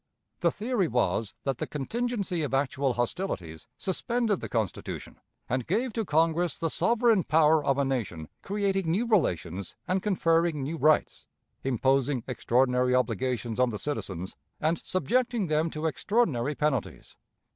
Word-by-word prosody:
The - - +3
theory 220 -4 0
was 110 -3 0
that 135 -3 -2
the - - -2
contingency 200 - -2
of 140 -3 -1
actual 135 -1 +1
hostilities 120 - -3
suspended 220 +2 0
the - - -5
Constitution 110 -6 -3 0.3
and 125 0 -1
gave 230 +7 0
to 225 - -1
Congress 165 +2 +2
the 165 -2 -1
sovereign 230 -4 +3
power 155 0 +4
of 135 -1 +1
a 140 - +2
nation 105 - -3
creating 195 -3 0
new 200 +9 +1
relations 95 - 0
and 185 +1 +1
conferring 165 -6 +1
new 155 +5 -3
rights, 155 -1 +2 0.4
imposing 135 0 +1
extraordinary 125 0 +2
obligations 125 -2 -1
on 125 -1 +4
the 110 - -4
citizens, 95 - -4 0.2
and 160 +2 0
subjecting 230 - 0
them 155 0 +1
to 155 0 -5
extraordinary 150 - +1
penalties. 150 -6 -2
150 Hz, 140 wpm, -28 LUFS, 125-190 Hz, 0.4 s, power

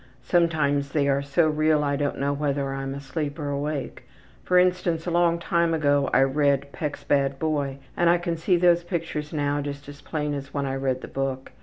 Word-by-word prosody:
Sometimes 150 -5 +1
they 145 -2 +2
are 140 0 +2
so 140 +4 +2
real 155 0 +2
I 140 -1 0
don't 145 0 -1
know 140 +1 0
whether 140 -1 -1
I'm 135 0 -4
asleep 145 +1 -4
or 145 -3 -3
awake. 145 0 -4 0.4
For 180 - +2
instance, 180 -2 +2
a 175 - -2
long 170 0 +3
time 170 -1 +1
ago 145 -3 +2
I - - +4
read 140 0 +1
Peck's 150 -2 -5
Bad 140 -1 +1
Boy 145 -3 -1 0.2
and 175 -1 +3
I 175 - +5
can 170 -1 -2
see 175 +3 +2
those 175 0 +4
pictures 165 -4 -4
now 145 -1 0
just 145 0 -6
as 145 0 -11
plain 150 -2 -3
as 135 0 -6
when 140 -1 0
I 135 - -2
read 135 -1 -1
the - - -7
book. 135 -1 -3
145 Hz, 205 wpm, -25 LUFS, 140-165 Hz, 0.4 s, I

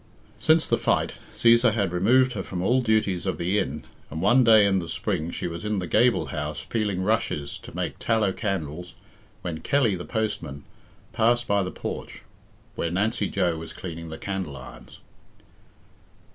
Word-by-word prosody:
Since 160 0 +4
the - - +1
fight, - - +1 0.2
Cæsar 115 -1 +4
had 100 -5 0
removed 125 +8 +3
her 100 - -3
from 90 -1 -4
all 125 +6 +3
duties 110 -6 +1
of 95 - -1
the 90 +4 +1
inn, 75 -2 -3 0.2
and 80 - -5
one 120 +9 +5
day 110 -3 +7
in 95 -1 +3
the 85 -2 -6
spring 80 +2 -2
she - - -5
was 85 +1 -5
in 105 -1 -1
the 90 - -2
gable 110 +3 +2
house 75 -3 -4
peeling 105 -5 -1
rushes 95 -8 -1
to - - -12
make - - -3
tallow 110 -4 +2
candles 90 -5 -4 0.5
when 80 -3 -4
Kelly, 125 - +2
the 90 - -6
postman, 85 -12 -3 0.5
passed 120 +2 +2
by 100 0 +2
the 90 - -2
porch, - - -6 0.5
where 85 - -2
Nancy 105 +3 0
Joe 90 -4 0
was 80 - -8
cleaning 85 -2 -7
the 80 - -6
candle 95 -8 -4
irons. 65 - -12
95 Hz, 175 wpm, -25 LUFS, 85-110 Hz, 0.5 s, day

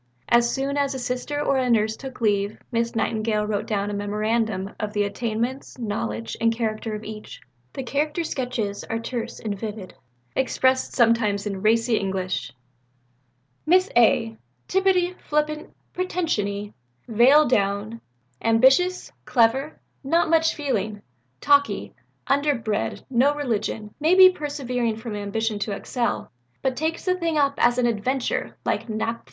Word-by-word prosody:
As 235 0 +4
soon 275 +1 -1
as 280 -1 0
a - - -2
Sister 250 +3 -3
or 275 -2 +1
a 255 -1 0
Nurse 220 -1 +2
took 260 0 -9
leave, 205 -1 +1
Miss 230 0 -1
Nightingale 215 -1 0
wrote 210 +1 -2
down 205 -2 -1
a - - -4
memorandum 210 -1 -1
of 210 -1 -3
the 205 -1 +1
attainments, 230 +6 -3
knowledge, 115 - -3
and 230 0 +4
character 220 -1 -2
of 210 - -7
each. 215 0 -8 0.3
The 270 - -4
character 300 +6 -1
sketches 240 -9 -3
are 225 - -2
terse 230 0 -5
and 210 -2 -3
vivid, 210 -3 -6 0.4
expressed 260 0 +1
sometimes 225 -4 +3
in 195 -2 -4
racy 225 +2 +3
English. 190 -6 -2 1.2
"Miss 370 +3 +4
A. 225 -1 +3 0.3
Tittupy, 370 -2 +2
flippant, 300 0 -1 0.2
pretension 350 - -1
y, 205 +1 -5 0.3
veil 255 +7 +5
down, 205 0 0 0.4
ambitious, 265 +11 +3
clever, 265 +5 +2 0.2
not 330 +4 +2
much 325 0 +3
feeling, 215 -8 -2 0.4
talk 285 0 +5
y, - - -5 0.3
underbred, 240 - 0
no 270 +4 +3
religion, 220 -6 -2
may 320 +4 +4
be 375 0 +9
persevering 255 -8 -2
from 220 -1 -6
ambition 210 +1 -2
to 205 0 -2
excel, 235 +4 -2 0.3
but 265 -1 0
takes 320 +4 -2
the 365 - +3
thing 335 -3 -1
up 280 -1 +3
as 240 +1 +4
an 250 - +2
adventure 240 +3 -1
like - - -1
Nap. 225 +1 -2
III." - - -23
235 Hz, 145 wpm, -24 LUFS, 215-280 Hz, 1.2 s, be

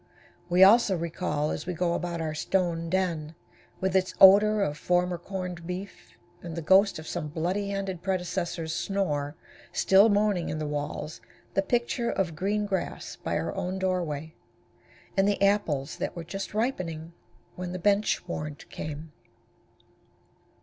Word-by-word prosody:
We 180 +2 +6
also 200 -1 +6
recall 165 -2 -2
as 155 - -5
we 180 - -2
go 170 0 +1
about 170 -1 -2
our 155 -1 -2
stone 165 +1 0
den, 165 -4 -1 0.4
with 190 0 -1
its 185 -1 +1
odor 205 +2 +7
of 150 -6 -1
former 180 0 +1
corned 180 -2 -6
beef, 185 +2 -7 0.2
and 170 -2 -7
the 170 - -4
ghost 195 +5 +5
of 155 - -8
some 160 -2 -4
bloody 180 +6 -2
handed 195 -3 -3
predecessor's 180 -3 -2
snore 150 -8 -1 0.4
still 195 +3 +5
moaning 205 -4 +2
in 155 - -3
the 155 - -3
walls, 145 +1 -4 0.3
the 195 - +3
picture 235 +2 0
of 175 -5 -1
green 205 +5 0
grass 190 -3 -3
by - - -2
our 85 +1 -2
own 185 +1 -3
doorway, 170 -5 -2 0.8
and 195 0 +3
the 205 - +1
apples 195 -9 +1
that - - -3
were 170 - -5
just 195 +4 -6
ripening, 170 -9 -2 0.4
when 180 -1 -5
the 185 - -3
bench 200 0 +1
warrant 150 -3 -5
came. 155 +1 -6
180 Hz, 150 wpm, -27 LUFS, 160-195 Hz, 0.8 s, odor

